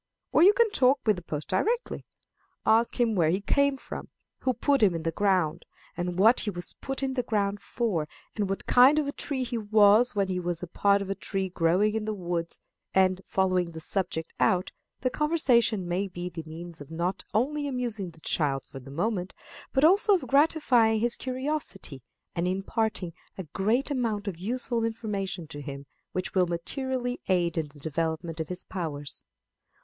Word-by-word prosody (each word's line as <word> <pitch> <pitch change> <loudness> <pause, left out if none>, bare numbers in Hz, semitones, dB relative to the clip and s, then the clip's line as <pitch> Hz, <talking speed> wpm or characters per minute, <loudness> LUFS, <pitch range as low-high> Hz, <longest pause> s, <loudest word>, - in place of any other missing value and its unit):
Or - - +4
you 390 +4 +8
can 465 -2 +3
talk 265 -7 +4
with 215 -2 +4
the - - -6
post 150 -3 -5
directly. 460 - -1 0.6
Ask 230 +3 +3
him 235 -2 +3
where 170 -6 +3
he 185 +4 +1
came 280 +7 +2
from, - - -8 0.3
who 260 - +1
put 280 -2 +2
him 195 -5 +4
in 165 - -4
the 165 - 0
ground, 185 -4 +1 0.3
and 175 0 -3
what 225 +6 +6
he 215 - -1
was 175 -3 -5
put 270 0 -4
in 265 -1 0
the 255 - 0
ground 205 -3 -1
for, 200 -12 -1 0.3
and 205 -3 -1
what 195 - -3
kind 260 +4 +6
of 305 - +2
a 280 - -2
tree 280 -2 -3
he 235 -1 -3
was 215 +2 +5
when 200 -1 +1
he 185 -1 -1
was 175 -1 -3
a - - -4
part 200 +3 +2
of 195 - -5
a - - +2
tree 195 -1 -2
growing 180 +5 +2
in 220 -1 -2
the 215 0 -2
woods; 175 -3 -3 0.4
and, 185 -1 +3
following 185 -3 +1
the 160 - -6
subject 165 -2 -2
out, 185 0 +2 0.3
the 255 - 0
conversation 245 - +2
may 185 +3 -1
be 180 -1 -5
the 170 -2 -6
means 165 0 -8
of 145 - -10
not 170 +3 -2
only 290 +6 +1
amusing 240 -8 -3
the 160 -1 -18
child 140 -5 0
for 135 - -10
the 135 +1 -12
moment, 180 +5 -2 0.4
but 265 - +2
also 395 +5 +6
of 360 - -2
gratifying 265 -7 +3
his 240 +2 +1
curiosity, 260 - -3 0.3
and 170 +1 -1
imparting 195 -1 -1 0.2
a 190 - -4
great 215 - 0
amount 225 -6 -1
of 195 - -2
useful 235 +3 -1
information 205 -6 -3
to 145 -1 -8
him 140 0 -7 0.3
which 185 - -3
will 185 -2 +3
materially 245 +8 -2
aid 175 -3 +1
in 160 -2 -1
the 145 0 -17
development 160 +2 -3
of 160 - -2
his 180 0 0
powers. 150 -6 -5
200 Hz, 190 wpm, -27 LUFS, 175-245 Hz, 0.6 s, you